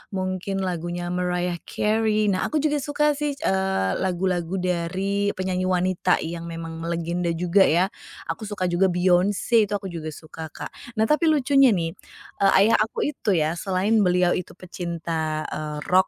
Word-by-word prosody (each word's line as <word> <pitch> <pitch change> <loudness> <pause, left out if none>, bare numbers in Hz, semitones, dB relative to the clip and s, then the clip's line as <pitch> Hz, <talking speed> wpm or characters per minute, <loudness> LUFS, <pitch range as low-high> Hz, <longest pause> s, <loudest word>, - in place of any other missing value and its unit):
mungkin 185 +1 -2
lagunya 175 0 -3
Mariah 180 -1 -1
Carey. 215 0 +1
Nah, 185 - 0
aku 310 - 0
juga 295 -1 +1
suka 295 +1 +1
sih, 290 0 -2
eee, 190 - 0
lagu-lagu 180 -1 -1
dari 185 +3 -1
penyanyi 185 0 -1
wanita 185 0 +2
yang 170 +1 -5
memang 165 0 -6
melegenda 170 +1 -2
juga, 180 +3 +3
ya. 175 +4 +3 0.4
Aku 220 - -5
suka 205 -3 -2
juga 180 +2 +2
Beyonce, 185 +5 +2
itu - - -3
aku 195 - -12
juga 165 -3 -5
suka, 155 +1 -9
Kak. - - -8 0.2
Nah, 220 - +3
tapi 305 +6 +3
lucunya 275 -2 +5
nih, 170 -6 0 0.5
eee, 195 -1 +5
ayah 225 - +4
aku 220 - -1
itu 215 -10 0
ya, 155 0 +1
selain 195 +5 +1
beliau 180 -2 +3
itu 180 - -4
pecinta, 165 -3 -3
eee, 150 -1 -4
rock 185 +1 +5
185 Hz, 160 wpm, -24 LUFS, 170-205 Hz, 0.5 s, lucunya